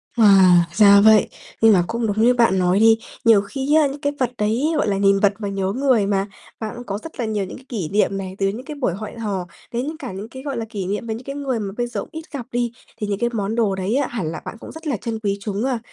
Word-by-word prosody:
Wow, 190 -5 +6
ra 200 -2 +7
vậy. 215 -1 +6 0.3
Nhưng 225 -1 +7
mà 180 - +4
cũng 230 -1 -2
đúng 210 +2 0
như 245 +2 +5
bạn 230 -6 +3
nói 180 +2 +2
đi, 225 0 +6 0.3
nhiều 225 -3 +6
khi 270 +8 -1
á, 310 -2 +5
những 280 +1 -7
cái 285 0 -1
vật 250 -2 0
đấy 235 +10 0
gọi - - +1
là 195 - 0
nhìn 195 0 +3
vật 205 0 +3
mà 205 - -3
nhớ 195 -1 -2
người 255 -6 +2
mà, 195 -1 0 0.3
bạn 220 0 -5
cũng 245 +1 -9
có 200 - -3
rất 325 -5 -10
là 235 - 0
nhiều 210 -3 -1
những - - -9
cái 260 - -17
kỷ 195 - -3
niệm 195 -1 +1
này, 190 -1 -6
từ 195 - +2
những 225 +7 -4
cái 300 - -7
buổi 250 -11 -1
hẹn 215 +4 -7
hò 195 -5 -3 0.2
đến 245 +4 -2
những 315 - -5
cả 320 - -7
những 200 +4 -7
cái 260 +2 -10
gọi 280 -4 -4
là 225 - -3
kỷ 200 -5 -4
niệm 205 +4 -3
với 220 - -2
những 240 - -9
cái 275 +1 -6
người 270 -5 -2
mà 195 -2 -4
bây 240 0 -1
giờ 240 - -4
ít 320 - -6
gặp 265 -5 -5
đi, 240 -1 -1 0.3
thì 210 - -3
những 200 -1 -2
cái 240 0 +1
món 210 0 -2
đồ 215 -5 +1
đấy 190 +5 -1
á 280 -2 +1
hẳn 210 -10 -4
là - - -6
bạn 225 - -7
cũng - - -10
rất 320 0 -9
là 270 - 0
trân 225 +2 -4
quý 200 -2 -1
chúng 210 +3 -2
a. 255 -4 0
220 Hz, 300 wpm, -21 LUFS, 200-245 Hz, 0.3 s, ra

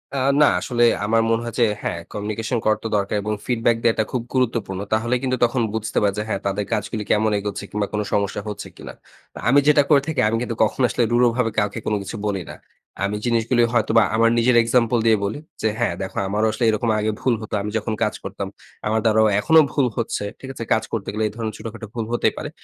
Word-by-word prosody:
আ - - -1 0.2
না - - +8
আসলে 120 -2 0 0.2
আমার 115 +2 +3
মনে 115 0 +2
হয় 115 - -5
যে, 120 - +6 0.2
হ্যাঁ, 85 - -3
communication 110 +4 -2
করার 110 0 +2
তো 115 - -2
দরকার 100 +1 -1
এবং 105 +1 -2
feedback 115 -1 +1
দেয়াটা 115 -1 +3
খুব 125 - -1
গুরুত্বপূর্ণ। 115 -7 0
তাহলে 120 +3 +1
কিন্তু 130 -1 0
তখন 120 +1 -1
বুঝতে 110 0 -3
পারি 100 -1 +2
যে, - - -1
হ্যাঁ, 105 - -1
তাদের 100 +1 -1
কাজগুলি 110 +1 -2
কেমন 110 +1 +3
এগোচ্ছে 100 0 -4
কিংবা 105 -1 -2
কোন 105 - 0
সমস্যা 100 0 0
হচ্ছে 100 -1 -6
কিনা? - - -9 0.4
আ - - -7
আমি 140 +3 +6
যেটা 150 -1 +6
করে 145 -3 +6
থাকি, 160 -2 -2
আমি 115 - 0
কিন্তু 120 -2 -3
কখনো 110 +4 0
আসলে 120 - +1
রূঢ়ভাবে 120 0 +3
কাউকে 105 +2 -1
কোনো 105 - 0
কিছু 100 - -7
বলি 100 -2 -1
না। - - -7 0.5
আমি 100 +1 0
জিনিসগুলি 120 0 +2
হয়তোবা 115 -1 +4
আমার 115 +1 +4
নিজের 120 +1 +3
example 115 0 +2
দিয়ে 110 -1 +5
বলি 105 +8 -3 0.2
যে - - +2
"হ্যাঁ, 120 -7 +1
দেখো 95 - -6
আমারও 105 +3 +1
আসলে 110 - -3
এরকম 115 +2 0
আগে 110 +1 0
ভুল 130 - +2
হতো। 110 - -8
আমি 105 +1 -4
যখন 110 - -2
কাজ 105 - 0
করতাম 100 0 -5 0.4
আমার 110 +1 +1
দ্বারাও 110 0 +4
এখনো 160 +10 +5
ভুল 135 -4 +2
হচ্ছে। 115 -3 -2 0.2
ঠিক 135 - -9
আছে? 115 - -6
কাজ 110 - +1
করতে 110 -3 -3
গেলে 110 +1 -1
এই - - -6
ধরনের 110 -2 -4
ছোটখাটো 110 0 -8
ভুল 115 -2 -2
হতেই 120 - +1
পারে। - - -5
110 Hz, 225 wpm, -22 LUFS, 105-120 Hz, 0.5 s, না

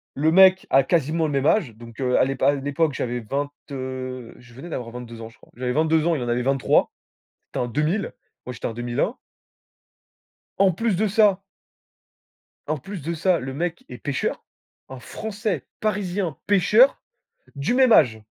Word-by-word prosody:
Le 155 +3 +2
mec 190 0 +6
a 135 0 +5
quasiment 160 +1 +1
le 150 - -2
même 140 0 0
âge, 160 - +2
donc 115 0 -13
heu, 125 -1 +2
à - - +4
l'épa 135 0 +1
à 145 - +2
l'époque, 145 +2 -1
j'avais 120 -1 -3
vingt, 140 +6 -3 0.2
heu, 130 -2 -6
je 120 -1 -17
venais 135 +8 -10
d'avoir 120 -6 -5
22 120 -2 -9
ans, 110 - -8
je - - -22
crois. - - -21
J'avais 125 0 -2
22 160 +2 +2
ans, 170 -1 +2
il 135 - -3
en 120 - -3
avait 120 +1 0
23. 135 0 +2 0.6
C'était - - -5
un 120 - -1
2000, 155 - -1 0.3
moi, 125 - -5
j'étais 120 - -8
en 115 - -2
2001. 120 - -2 1.4
En 195 -1 +4
plus 215 +2 -1
de 215 +3 +1
ça 200 -2 +3 1.3
en 155 0 -1
plus 190 +4 -8
de 165 +4 -3
ça, 175 +1 +2
le 130 +1 -6
mec 175 +2 -3
est 125 - -8
pêcheur. 140 +1 -3 0.5
Un 130 -1 -8
Français, 205 - -4
parisien, 195 -6 -2
pêcheur, 210 +7 +4 0.5
du 140 +8 -1
même 255 -3 +5
âge! 115 - +4
145 Hz, 185 wpm, -23 LUFS, 125-185 Hz, 1.4 s, mec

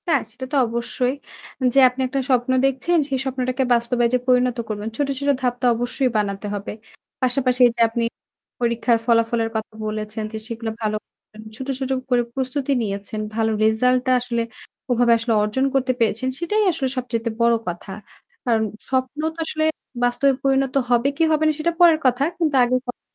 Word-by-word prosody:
হ্যাঁ, 300 -6 +3
সেটা 260 - -7
তো - - -1
অবশ্যই। 235 +2 -1 0.6
যে 275 - +5
আপনি 250 +1 -6
একটা 270 +2 -2
স্বপ্ন 250 -1 +2
দেখছেন 270 +6 +1
সে 275 - -1
স্বপ্নটাকে 255 0 -1
বাস্তবে 240 +1 +1
যে - - +5
পরিণত 250 -1 +3
করবেন। 210 0 -3
ছোট, 285 - 0
ছোট 285 0 -1
ধাপটা 250 0 -1
অবশ্যই 245 +2 0
বানাতে 200 -1 -2
হবে। 200 0 -5 0.5
পাশাপাশি 255 0 +2
এই - - 0
যে - - 0
আপনি 230 +1 -2 0.6
পরীক্ষার 235 0 +2
ফলাফলের 230 -1 +2
কথা 220 0 -4
বলেছেন 215 +1 -4
যে - - -3
সেগুলো 230 -1 -4
ভালো 215 -1 0
করেছেন, 215 - -18
ছোট, 260 +3 -7
ছোট 265 -1 -3 0.2
করে 245 -1 +3
প্রস্তুতি 265 +1 -2
নিয়েছেন। 200 0 -4 0.2
ভালো 225 0 +1
রেজাল্ট 250 +4 +3
টা - - +3
আসলে 240 -1 -2 0.5
ওভাবে 240 0 +3
আসলে 230 0 -1
অর্জন 215 +6 0
করতে 260 -1 +2
পেরেছেন 230 +2 +1
সেটাই 420 +6 +1
আসলে 305 -5 -2
সবচাইতে 235 -2 -2
বড় 235 0 +5
কথা। 175 +3 -5 0.6
কারণ 225 -3 +2 0.3
স্বপ্ন 260 +2 -1 0.2
তো - - -12
আসলে 310 0 -2 0.4
বাস্তবে 245 +3 +3
পরিণত 270 -1 +2 0.2
হবে 240 +2 +3
কি - - +2
হবে 310 0 +2
না - - +4
সেটা 335 +2 +1
পরের 330 -3 +7
কথা। 255 +1 +3
কিন্তু 315 -4 0
আগের 250 +1 +1
কথা 245 - -6
245 Hz, 175 wpm, -22 LUFS, 230-265 Hz, 0.6 s, পরের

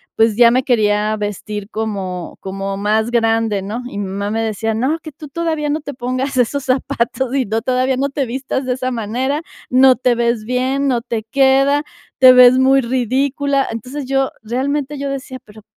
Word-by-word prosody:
pues, 225 -1 +2
ya 235 -1 +7
me 255 +2 +2
quería 215 -3 +1
vestir 205 0 -5
como 195 -5 -4
como 195 0 -4
más 215 +3 0
grande, 225 -3 +1
¿no? 220 +5 -5
Y - - -8
mi 200 - -2
mamá 200 +2 -3
me 225 0 -1
decía: 220 0 -2
"No, 265 +9 0
que 310 - -10
tú 300 +2 -10
todavía 315 -1 -2
no 300 +1 -1
te 285 - -7
pongas 255 +2 -3
esos 260 +3 0
zapatos 255 0 -1
y 265 -2 +1
no 220 +2 -1
todavía 255 +1 0
no 275 +2 0
te 275 0 -2
vistas 260 +2 -3
de 250 - 0
esa 255 0 -3
manera, 250 +6 -2 0.3
no 260 +1 +6
te 250 0 +2
ves 235 -2 0
bien, 260 +3 0
no 245 -3 0
te 230 -2 -4
queda, 275 +4 +3 0.4
te 255 -1 +9
ves 250 0 +7
muy 270 +1 +4
ridícula". 270 +3 0
Entonces, 255 +5 -6
yo 270 0 0
realmente 275 +5 -2
yo 280 - -3
decía: 265 -1 -6
"Pero, 215 0 -16
250 Hz, 190 wpm, -18 LUFS, 220-270 Hz, 0.4 s, te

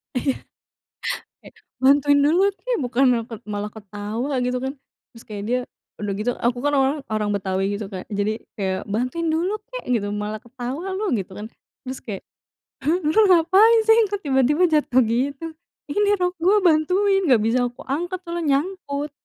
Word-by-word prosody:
Iya. 260 +1 0 1.4
Bantuin 285 +2 +5
dulu 360 +7 +4
kek, - - -2
bukannya 245 -1 +2
tet 225 -1 -8
malah 210 0 -3
ketawa 210 +5 -5
gitu 250 0 0
kan. 265 +2 -3 0.4
Terus 230 - -13
kayaknya, 215 +4 -2 0.4
udah 205 -1 -2
gitu 215 +4 0
aku 240 +1 0
kan 290 - +2
orang 270 +2 +2
orang 210 -1 0
Betawi 195 0 -1
gitu 210 - -5
Kak. 185 -1 -6
Jadi 210 +2 -1 0.2
kayak, 190 -1 -2
"Bantuin 255 +10 -1
dulu 340 +6 0 0.2
kek - - -6
gitu, 220 -5 +1
malah 210 +1 -4
ketawa 255 +9 -5
lu," 410 -3 -1
gitu 195 -2 -5
kan. 210 - -6 0.4
Terus 260 +1 -5
kayak, 200 -4 -6 0.7
"Lu 320 +2 +2
ngapain 380 +7 +6
sih? 445 0 +7
Kok 410 0 -2
tiba-tiba 275 +5 +3
jatuh 295 -5 +3
gitu." 265 +7 -1 0.4
"Ini 410 +7 +2
rok 360 0 +1
gue 385 +5 +5
bantuin, 370 +5 +3
enggak 245 -5 +5
bisa 225 +3 +2
aku 240 - -14
angkat 350 +7 -2
soalnya 335 -5 +1
nyangkut." 295 -4 -5
265 Hz, 160 wpm, -22 LUFS, 220-335 Hz, 1.4 s, sih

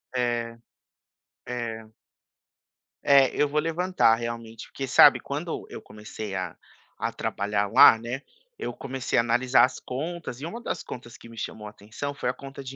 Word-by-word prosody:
É. 120 -2 -1 0.9
É. 115 -2 -5 1.1
É, 140 -2 +6
eu 150 - +2
vou 150 +1 0
levantar 165 -6 +2
realmente 115 -1 -6
porque 135 - -5
sabe - - +7
quando - - -5
eu - - -8
comecei 105 -1 -8
a 95 -1 -4 0.5
a - - -1
trabalhar 105 0 -1
lá, 115 - +9
né, 120 +4 -5 0.4
eu - - -4
comecei 135 -1 -3
a - - +6
analisar 120 +2 +3
as 130 0 +1
contas 150 -1 -5
e - - -4
uma 200 +8 -6
das - - -4
contas 120 -1 -9
que 115 - -14
me 115 - -13
chamou 105 0 -6
a - - -6
atenção 110 +8 -6
foi 140 - -4
a 125 - +1
conta 135 +1 -10
de 135 0 -8
120 Hz, 170 wpm, -26 LUFS, 115-135 Hz, 1.1 s, lá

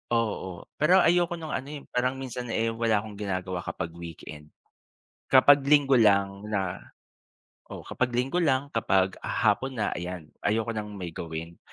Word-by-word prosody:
Oo, 105 -6 -2 0.2
pero 175 +5 +6
ayoko 175 +1 +3
nung 160 -2 -6
ano, 130 - -3
eh, 145 -1 -7
parang 125 +2 0
minsan, 125 -2 -6
eh, 115 0 0
wala 115 -1 +1
akong 105 -2 -10
ginagawa 95 -3 -3
kapag 85 -1 -5
weekend, 80 -3 -10 0.8
kapag 140 +2 +7
linggo 140 -2 +5
lang 100 -1 +2
na 95 -4 -2 0.9
o - - -8
kapag 125 -1 -2
linggo 130 +8 0
lang 140 -4 +1
kapag 95 -4 +1
hapon 125 +5 0
na, 105 -3 -1
ayan 90 -3 -6
ayoko 110 +2 0
ng 105 -2 -4
may 90 -3 -6
gawin 85 +1 -7
110 Hz, 155 wpm, -27 LUFS, 95-130 Hz, 0.9 s, kapag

